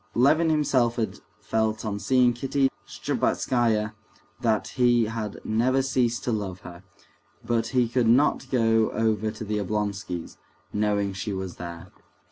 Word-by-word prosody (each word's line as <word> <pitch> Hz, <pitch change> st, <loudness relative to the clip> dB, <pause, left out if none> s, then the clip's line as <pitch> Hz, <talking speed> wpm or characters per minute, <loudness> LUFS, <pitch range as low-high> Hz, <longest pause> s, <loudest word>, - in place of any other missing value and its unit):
Levin 155 Hz, +7 st, +4 dB
himself 130 Hz, -6 st, +2 dB
had 110 Hz, -4 st, -3 dB, 0.2 s
felt 110 Hz, +1 st, -1 dB
on 100 Hz, -1 st, -2 dB
seeing 125 Hz, +1 st, +3 dB
Kitty 135 Hz, +2 st, 0 dB, 0.2 s
Shtcherbatskaya 110 Hz, -4 st, 0 dB, 0.5 s
that 115 Hz, -3 st, 0 dB
he 120 Hz, -2 st, +3 dB
had 110 Hz, -2 st, -4 dB
never 130 Hz, +5 st, +1 dB
ceased 120 Hz, -3 st, 0 dB
to 125 Hz, -, -1 dB
love 100 Hz, -4 st, -3 dB
her; 85 Hz, 0 st, -10 dB, 0.6 s
but 115 Hz, -1 st, 0 dB
he 125 Hz, 0 st, +2 dB
could 120 Hz, 0 st, +1 dB
not 130 Hz, +2 st, +3 dB
go 115 Hz, -3 st, +3 dB
over 110 Hz, -1 st, +1 dB
to 110 Hz, 0 st, -7 dB
the 105 Hz, 0 st, -1 dB
Oblonskys', 100 Hz, -3 st, -3 dB, 0.4 s
knowing 105 Hz, -1 st, 0 dB
she 100 Hz, +2 st, -4 dB
was 95 Hz, -2 st, -5 dB
there. 85 Hz, +1 st, -8 dB
110 Hz, 140 wpm, -26 LUFS, 105-125 Hz, 0.6 s, Levin